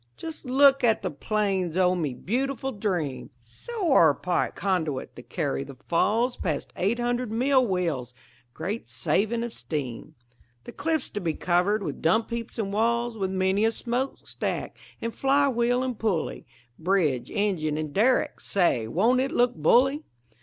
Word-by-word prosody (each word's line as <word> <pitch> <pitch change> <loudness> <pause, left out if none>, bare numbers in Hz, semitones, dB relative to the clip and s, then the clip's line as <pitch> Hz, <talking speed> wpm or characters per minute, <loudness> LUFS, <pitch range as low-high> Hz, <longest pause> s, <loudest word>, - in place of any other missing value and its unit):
"Just 320 -2 -8
look 275 +1 +5
at 225 -4 +3
the 185 - -1
plans 190 0 -1
o' 180 -1 +4
me 155 -8 -2
beautiful 265 - -2
dream! 180 - -2
A - - -32
sewer 275 - +2
pipe 180 -1 -1
conduit 160 -8 -2
to - - -9
carry 140 0 -2
the 140 -1 -10
Falls 225 - +1
Past 155 -5 -3
eight 205 +6 0
hundred 240 -1 -1
mill 255 +2 +3
wheels 165 - -1 0.4
(great 210 +5 -4
savin' 230 +3 0
of 235 -1 -5
steam): 135 -7 -5 0.5
The - - -9
cliffs 315 +2 -2
to 205 - -4
be 165 -3 -1
covered 185 +4 +1
with - - -5
dump 220 +9 +2
heaps 235 +1 -5
and 200 -3 -2
walls, 235 +2 +1
With 195 -3 -2
many 190 +2 +1
a 225 - +4
smokestack 245 +4 -3 0.3
and 230 0 -2
fly 280 +1 +3
wheel 245 0 +1
and 255 -4 -3
pulley, 195 - -1 0.3
Bridge, 160 -8 +1
engine, 170 -8 0
and 155 -2 -4
derrick 240 +6 +2
say, 155 - +1
won't 220 - +2
it 270 - 0
look 245 -1 +2
bully! 255 - +3
205 Hz, 160 wpm, -26 LUFS, 170-245 Hz, 0.5 s, look